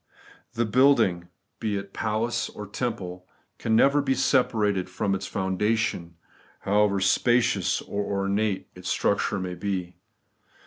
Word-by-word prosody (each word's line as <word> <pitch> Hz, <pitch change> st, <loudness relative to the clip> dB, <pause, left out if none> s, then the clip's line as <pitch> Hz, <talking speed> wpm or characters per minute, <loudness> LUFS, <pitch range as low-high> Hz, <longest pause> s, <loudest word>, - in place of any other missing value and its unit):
The 120 Hz, +1 st, 0 dB
building, 110 Hz, -7 st, +3 dB, 0.3 s
be 105 Hz, -3 st, -1 dB
it 100 Hz, 0 st, -7 dB
palace 110 Hz, +2 st, -1 dB
or 105 Hz, -, -8 dB
temple, 95 Hz, -5 st, -5 dB, 0.3 s
can 110 Hz, -1 st, +1 dB
never 140 Hz, +5 st, +5 dB
be 135 Hz, -1 st, 0 dB
separated 105 Hz, -8 st, +1 dB
from 100 Hz, +2 st, -1 dB
its 95 Hz, -, -3 dB
foundation, 95 Hz, -2 st, -1 dB, 0.5 s
however 100 Hz, 0 st, +2 dB
spacious 120 Hz, +5 st, +2 dB
or 100 Hz, 0 st, -3 dB
ornate 100 Hz, 0 st, -1 dB
its -, -, -7 dB
structure -, -, +1 dB
may 90 Hz, -1 st, -4 dB
be. 90 Hz, -1 st, -4 dB
105 Hz, 125 wpm, -26 LUFS, 95-115 Hz, 0.5 s, never